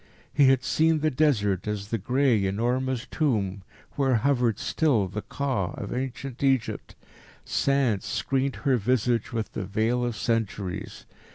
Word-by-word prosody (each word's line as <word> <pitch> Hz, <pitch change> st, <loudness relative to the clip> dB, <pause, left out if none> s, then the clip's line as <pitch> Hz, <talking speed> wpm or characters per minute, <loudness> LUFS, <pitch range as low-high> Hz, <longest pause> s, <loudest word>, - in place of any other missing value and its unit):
He 140 Hz, 0 st, +5 dB
had 130 Hz, -1 st, +4 dB
seen 160 Hz, -1 st, +2 dB
the 155 Hz, 0 st, +2 dB
Desert 105 Hz, -, +1 dB
as 105 Hz, -1 st, -3 dB
the 115 Hz, -, -1 dB
grey, 125 Hz, -2 st, +2 dB
enormous 125 Hz, +5 st, -1 dB
Tomb 105 Hz, -10 st, 0 dB, 0.3 s
where 135 Hz, -3 st, +1 dB
hovered 120 Hz, -2 st, +2 dB
still 130 Hz, -, +1 dB
the 105 Hz, +3 st, -5 dB
Ka 130 Hz, -11 st, -2 dB
of -, -, -5 dB
ancient 130 Hz, +1 st, -4 dB
Egypt. 135 Hz, -3 st, 0 dB, 0.5 s
Sand 135 Hz, -7 st, +1 dB
screened 130 Hz, +4 st, -1 dB
her 135 Hz, -3 st, +4 dB
visage 120 Hz, +2 st, 0 dB
with 115 Hz, -2 st, -3 dB
the -, -, -4 dB
veil 110 Hz, +5 st, 0 dB
of 120 Hz, -2 st, -2 dB
centuries. 105 Hz, -5 st, -3 dB
125 Hz, 145 wpm, -26 LUFS, 105-135 Hz, 0.5 s, He